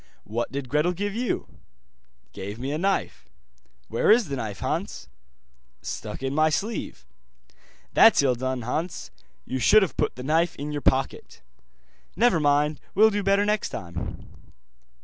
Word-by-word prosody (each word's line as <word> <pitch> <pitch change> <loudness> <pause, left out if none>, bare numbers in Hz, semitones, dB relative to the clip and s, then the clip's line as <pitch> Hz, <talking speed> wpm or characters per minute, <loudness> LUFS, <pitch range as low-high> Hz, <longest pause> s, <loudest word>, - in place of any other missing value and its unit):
'What 115 +3 -3
did 140 -1 -4
Gretel 150 +6 +1
give 200 +3 -3
you?' 240 +2 -3 0.7
'Gave 100 +2 -6
me 130 +4 -4
a 150 - -2
knife.' 195 +2 -1 0.6
'Where 115 - 0
is 220 -5 +5
the 140 - -2
knife, 110 -6 -4
Hans?' 160 - -3 0.8
'Stuck - - -6
in 135 0 -1
my 155 +2 +3
sleeve.' 205 - -3 0.9
'That's - - +6
ill 130 -2 +3
done, 130 0 -3
Hans, 155 - -4 0.3
you 130 - -3
should 215 - +6
have 185 - -4
put - - 0
the 125 - -7
knife 165 +4 +1
in 145 +1 -5
your 145 -1 -3
pocket.' 135 0 -1 0.7
'Never 235 -8 +3
mind, 145 0 +2 0.2
will 220 +3 +6
do 205 0 -1
better 200 +1 +2
next 210 0 0
time. 85 0 -6
150 Hz, 150 wpm, -25 LUFS, 130-195 Hz, 0.9 s, That's